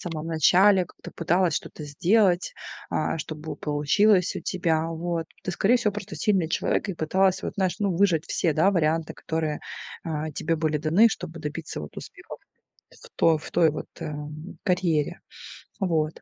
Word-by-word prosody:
самом 165 -3 -5
начале, 180 +4 +5
как-то - - -13
пыталась 175 0 +1
что-то 155 - -5
сделать, 180 +5 +2 0.4
а, 155 - 0
чтобы 155 -1 -6
получилось 180 +7 +2
у - - -4
тебя. 165 -3 0
Вот. 165 0 -3 0.2
Ты, 185 - -2
скорее 205 +7 +3
всего, 215 -4 0
просто 205 -1 -7
сильный 190 -6 +1
человек 185 - 0
и 195 - -2
пыталась, 190 +4 +1
вот, - - -3
знаешь, 185 -2 0
ну, 200 -4 0
выжать 175 -4 +3
все, 165 - +1
да, 160 +6 +3
варианты, 160 -2 0
которые, 160 -2 -3 0.4
а, 155 -1 -3
тебе 165 +3 -1
были 155 -1 0
даны, 165 +10 +5
чтобы 165 -6 -6
добиться 155 - -5
вот 75 - -9
успехов - - -10 0.5
в - - -16
той, 165 -1 +4
в - - -10
той 170 -2 +4
вот, 155 - -5 0.2
э, 150 - -4 0.5
карьере. 175 -4 0 0.6
Вот. 160 -5 0
165 Hz, 165 wpm, -25 LUFS, 155-190 Hz, 0.6 s, начале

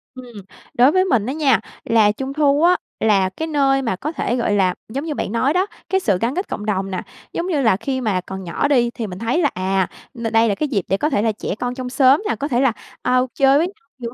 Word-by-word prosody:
Ừm. 250 -2 -11 0.4
Đối 250 +4 +5
với 370 +3 +3
mình 245 - +1
á 260 - -2
nha, 280 -8 +3 0.3
là 220 -2 +4
Trung 265 +5 -5
thu 290 0 +2
á, 355 +1 +5 0.2
là 200 -4 +3
cái 315 +12 -5
nơi 275 -3 +2
mà 230 -7 -1
có 290 +11 -4
thể, 245 -6 -2
gọi 235 -4 0
là, 185 -2 +2 0.2
giống 275 +7 -4
như 315 - -2
bạn 195 - -3
nói 255 +6 +1
đó, 365 +2 +2 0.2
cái 380 - +2
sự 205 - +1
gắn 240 +5 0
kết 370 +3 -2
cộng 210 - -5
đồng 195 -2 -1
nè, 185 - -3 0.3
giống 345 - -2
như 315 -6 0
là 225 -6 +4
khi 260 +4 -3
mà 205 -6 0
còn 190 +1 -7
nhỏ 175 +10 -1
đi 250 -4 +3
thì 225 - -4
mình 180 -1 -8
thấy 235 +9 0
là, 190 - 0 0.3
n - - -6
đây 225 0 +4
là 200 - +1
cái 300 - -1
dịp 200 -9 -1
để 195 - +1
có 300 - 0
thể 205 - +1
là 225 0 +2
trẻ 205 -2 -4
con 245 0 -2
trong 255 -1 -5
xóm 265 +3 +4
nè, - - +1
có 285 - -3
thể 255 -3 +1
là, 270 - +4 0.3
a, 250 - +2 0.2
chơi 275 0 +4
với 330 +4 +2 0.3
nhau 240 -2 -5
250 Hz, 265 wpm, -20 LUFS, 210-285 Hz, 0.4 s, Đối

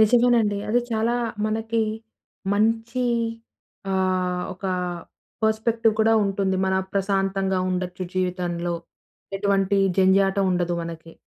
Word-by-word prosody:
నిజమేనండి. 230 -2 +4
అది 240 +3 +3
చాలా 225 +2 +1 0.3
మనకి 225 +1 -1 0.7
మంచి 225 +3 +1 0.9
ఆహ్, 185 -1 0
ఒక 185 - -26 0.8
పర్స్‌పెక్టివ్ 220 +1 +2
కూడా 225 +1 +4
ఉంటుంది. 195 -1 0
మన 190 - +1 0.2
ప్రశాంతంగా 195 -1 0
ఉండొచ్చు 180 0 -3
జీవితంలో, 175 -2 -1 0.6
ఎటువంటి 200 0 +1 0.2
జంఝాటం 195 +1 +4
ఉండదు 175 -1 0
మనకి. 165 -1 -8
195 Hz, 95 wpm, -24 LUFS, 185-220 Hz, 0.9 s, నిజమేనండి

